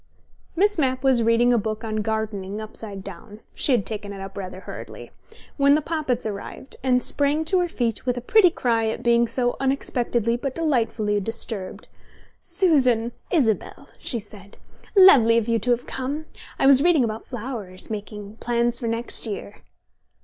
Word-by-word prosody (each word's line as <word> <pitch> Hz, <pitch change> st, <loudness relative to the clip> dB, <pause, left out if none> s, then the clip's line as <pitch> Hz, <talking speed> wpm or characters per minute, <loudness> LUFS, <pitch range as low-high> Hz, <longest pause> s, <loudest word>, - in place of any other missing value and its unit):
Miss 410 Hz, +1 st, +2 dB
Mapp 260 Hz, -2 st, 0 dB
was 260 Hz, -3 st, +4 dB
reading 230 Hz, +2 st, +3 dB
a 235 Hz, -, +3 dB
book 215 Hz, +1 st, -4 dB
on 215 Hz, -1 st, -3 dB
gardening 210 Hz, -2 st, -3 dB
upside 215 Hz, -2 st, -7 dB
down 200 Hz, +3 st, -10 dB
(she -, -, -1 dB
had 235 Hz, -7 st, +2 dB
taken 210 Hz, -2 st, -5 dB
it 200 Hz, -, -8 dB
up 195 Hz, 0 st, -8 dB
rather 185 Hz, -1 st, -7 dB
hurriedly) -, -, -9 dB, 0.5 s
when 280 Hz, 0 st, +5 dB
the -, -, +3 dB
Poppits 290 Hz, -7 st, -2 dB
arrived, 210 Hz, +5 st, -6 dB
and 250 Hz, -2 st, +2 dB
sprang 290 Hz, +2 st, +2 dB
to 370 Hz, +3 st, +2 dB
her 355 Hz, -, +1 dB
feet 235 Hz, -7 st, -2 dB
with 250 Hz, -1 st, -1 dB
a -, -, 0 dB
pretty 365 Hz, -, +5 dB
cry 230 Hz, -8 st, 0 dB
at 220 Hz, -, -3 dB
being 235 Hz, 0 st, +3 dB
so 245 Hz, 0 st, 0 dB
unexpectedly 245 Hz, -4 st, 0 dB
but 260 Hz, +1 st, -4 dB
delightfully 230 Hz, -9 st, 0 dB
disturbed. 205 Hz, -2 st, -5 dB, 0.5 s
"Susan! 255 Hz, -, +2 dB, 0.2 s
Isabel!" 245 Hz, -, 0 dB
she 235 Hz, -, -3 dB
said. 200 Hz, -1 st, -15 dB, 0.4 s
"Lovely 255 Hz, -, +7 dB
of 230 Hz, -1 st, 0 dB
you 230 Hz, -1 st, +1 dB
to 230 Hz, +4 st, -4 dB
have 240 Hz, 0 st, +1 dB
come! 280 Hz, +4 st, -4 dB, 0.3 s
I -, -, +1 dB
was 270 Hz, -1 st, +7 dB
reading 330 Hz, -4 st, +4 dB
about 220 Hz, -1 st, -4 dB
flowers, 225 Hz, -7 st, -6 dB
making 210 Hz, 0 st, -7 dB
plans 240 Hz, 0 st, 0 dB
for 235 Hz, -, -3 dB
next 230 Hz, +1 st, -2 dB
year." 205 Hz, -1 st, -6 dB
235 Hz, 170 wpm, -23 LUFS, 215-265 Hz, 0.5 s, Lovely